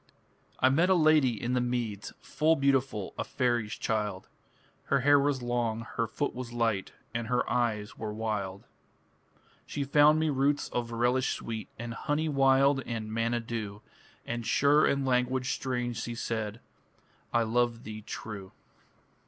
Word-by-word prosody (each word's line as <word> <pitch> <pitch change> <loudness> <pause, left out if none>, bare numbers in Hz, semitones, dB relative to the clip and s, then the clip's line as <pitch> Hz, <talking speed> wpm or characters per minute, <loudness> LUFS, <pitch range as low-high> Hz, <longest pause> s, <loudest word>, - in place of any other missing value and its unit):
I 130 - +5
met 165 +7 +3
a 190 - +5
lady 155 - +4
in 120 +4 -2
the 125 - +2
meads, 120 -4 -2
Full 160 +2 +2
beautiful 135 -7 0
a - - +1
faery's 120 -4 0
child; 105 -4 -2 0.6
Her 140 - +2
hair 145 +2 +6
was 140 -2 0
long, 120 -2 -1
her 115 - 0
foot 145 - -2
was 125 -1 -6
light, 115 -5 0 0.2
And 115 0 -2
her 125 +1 +1
eyes 110 -4 -1
were 110 -1 -3
wild. 105 -3 -3 1.0
She 145 - -3
found 145 +2 +5
me 160 -1 +1
roots 140 +1 +1
of 120 -1 -2
relish 120 +2 +1
sweet, 110 -1 -6
And 115 0 -5
honey 150 +6 -1
wild 135 0 +4
and 110 -2 -4
manna 115 +1 0
dew; 110 -3 -5 0.4
And 120 0 -3
sure 145 +5 +4
in 140 -1 +1
language 125 0 +1
strange 125 -2 -2
she 120 - -4
said, 110 -2 -3 0.7
"I 120 -1 +3
love 120 +1 0
thee 110 0 -7
true". 105 -2 -7
120 Hz, 155 wpm, -29 LUFS, 110-135 Hz, 1.0 s, hair